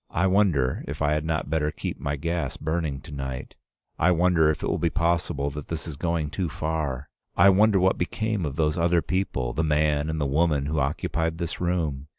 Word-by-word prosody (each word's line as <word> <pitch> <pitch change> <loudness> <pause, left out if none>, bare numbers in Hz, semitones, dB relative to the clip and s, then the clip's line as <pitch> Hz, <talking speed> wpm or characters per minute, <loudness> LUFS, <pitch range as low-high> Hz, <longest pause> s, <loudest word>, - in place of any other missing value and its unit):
I 90 - +1
wonder 90 -10 +2
if 75 +1 -5
I 75 -1 +2
had 75 0 0
not 80 -3 -2
better 75 -2 +1
keep - - -5
my 70 0 -2
gas 80 -1 -2
burning 80 -3 -2
to - - -12
night? 65 -2 -5 0.5
I 85 - +4
wonder 85 -2 +4
if 75 - -1
it - - -1
be 85 - +2
possible 85 -3 0
that 75 0 -7
this 80 -1 -4
is 80 - -5
going 80 -1 -1
too 90 -1 -2
far? 75 -4 -3 0.3
I 95 +3 +7
wonder 100 +1 +5
what 95 +1 +2
became 110 +2 -1
of 70 -3 -3
those 80 0 +1
other 85 -1 +3
people, 70 -7 -1
the 80 - 0
man 75 -1 +1
and 80 0 -2
the 75 - 0
woman 75 0 +1
who 75 +2 -1
occupied 80 +3 -1
this 85 0 -4
room? 80 -6 -1
80 Hz, 205 wpm, -25 LUFS, 75-85 Hz, 0.5 s, I